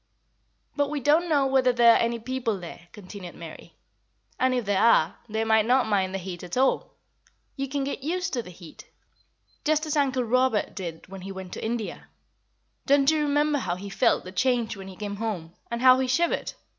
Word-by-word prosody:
"But 285 -1 +1
we 300 0 -2
don't 310 +6 +2
know 285 -3 +3
whether 265 -1 +3
there 235 -1 +6
are - - +4
any 235 0 0
people 235 -3 -3
there," 175 0 -10
continued 185 -3 -10
Mary, 165 -2 -11 0.6
"and 255 0 +2
if 245 -3 -1
there 200 -1 +1
are, 180 -8 +4
they 220 +1 -1
might 220 -1 +3
not 255 +1 +4
mind 195 -3 +1
the 195 - -2
heat 180 -2 -7
at 180 +5 -6
all. 265 +1 +1 0.6
You 275 -1 -3
can 280 0 -2
get 275 0 -4
used 345 +4 -2
to 245 - 0
the 200 - -12
heat, 170 -2 -13 0.7
just 310 +1 +1
as 310 - -2
Uncle 270 -3 +1
Robert 255 -1 +1
did 170 -4 -7
when 195 0 -9
he 195 +2 -7
went 190 -1 -8
to - - -6
India. 225 -1 -4 0.8
Don't 280 +1 +5
you 310 -1 +1
remember 295 0 +1
how 175 -7 -2
he 200 +2 -8
felt - - +2
the 185 - -9
change 240 +1 0
when 195 -1 -9
he 190 - -10
came 205 0 -5
home, 190 -7 -4 0.2
and 235 +1 -3
how 255 0 +7
he 260 - 0
shivered? 335 +7 0
235 Hz, 205 wpm, -26 LUFS, 195-270 Hz, 0.8 s, how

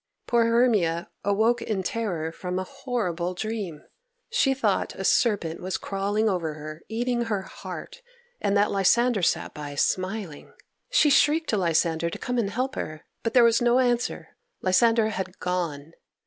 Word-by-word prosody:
] - - -56
Poor 235 -1 +3
Hermia 215 -8 +2
awoke 220 +4 +2
in 200 -4 -2
terror 180 -7 -2
from 180 +2 -4
a 185 - -1
horrible 185 -9 -3
dream. 200 -6 -4 0.5
She 270 - +2
thought 270 - 0
a - - -5
serpent 195 -9 +2
was 185 +1 -2
crawling 205 +2 -1
over 170 -6 -1
her, 155 +1 -8
eating 240 +1 -1
her 210 -4 -1
heart, 485 - -9 0.4
and 200 0 +2
that 205 +1 +3
Lysander 220 +3 +3
sat 175 - 0
by 145 -1 -7
smiling. 185 0 -2 0.4
She 335 -12 +4
shrieked 305 +3 +3
to 215 - +1
Lysander 170 -2 +1
to - - -6
come 250 -1 -2
and 205 -4 0
help 255 +5 -2
her. 155 0 -6 0.2
But 230 - -3
there 245 - +8
was 230 0 +4
no 240 +1 +4
answer; 245 -2 0 0.3
Lysander 220 +4 +3
had 190 -3 -5
gone. 165 -4 -3
205 Hz, 160 wpm, -26 LUFS, 175-235 Hz, 0.5 s, there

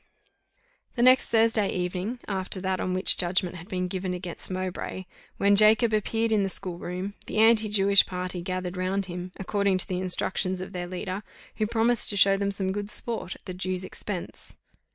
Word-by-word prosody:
The 240 - +1
next 255 +1 +5
Thursday 225 -2 +3
evening 185 +6 -3
after 190 -1 -1
that 190 0 -1
on 185 0 -1
which 185 - +3
judgment 180 0 0
had 175 +2 -11
been 185 -3 -2
given 185 0 -3
against 180 -1 -6
Mowbray, 185 0 -4 0.3
when 200 0 +4
Jacob 215 +2 +5
appeared 225 +2 0
in 215 -2 +3
the 195 - 0
school 180 -2 -4
room, 185 +3 -5
the - - -4
anti 220 0 +5
Jewish 200 -1 +5
party 180 -1 -4
gathered 185 0 -4
round 190 +2 -1
him, 180 0 -6
according 200 0 0
to 185 - +2
the 185 -3 -2
instructions 185 0 0
of 185 - -7
their 175 -1 -4
leader, 185 +2 -4 0.4
who 215 -1 0
promised 230 +1 +3
to 205 - +3
show 195 0 +6
them 200 0 -1
some 195 -1 -1
good 205 +1 -4
sport 220 -4 -3
at - - -20
the 185 - -5
Jew's 185 0 -3
expense. 185 -1 -5
190 Hz, 190 wpm, -26 LUFS, 185-210 Hz, 0.4 s, show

